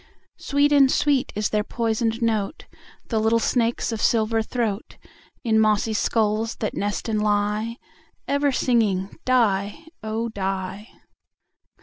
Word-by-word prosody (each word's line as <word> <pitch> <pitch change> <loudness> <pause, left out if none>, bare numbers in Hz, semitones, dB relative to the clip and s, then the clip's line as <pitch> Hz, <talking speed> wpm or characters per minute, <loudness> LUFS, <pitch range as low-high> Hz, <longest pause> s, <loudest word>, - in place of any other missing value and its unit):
Sweet 285 +1 +2
and 275 -2 +5
sweet 285 -3 +1
is 210 0 0
their 210 -1 0
poisoned 225 +1 -1
note, 220 +3 -1 0.4
The 225 - +1
little 220 +1 +3
snakes' 235 0 0
of 225 - -4
silver 225 0 +2
throat, 220 -2 -3 0.5
In 220 -3 +2
mossy 215 0 +2
skulls 215 +1 0
that 215 - -3
nest 205 +2 -3
and 215 -2 0
lie, 210 +2 0 0.5
Ever 280 0 +2
singing 210 -7 +1
"die, 215 0 +1 0.2
oh! 220 +1 -2
die." 195 0 -4
220 Hz, 125 wpm, -23 LUFS, 210-235 Hz, 0.5 s, and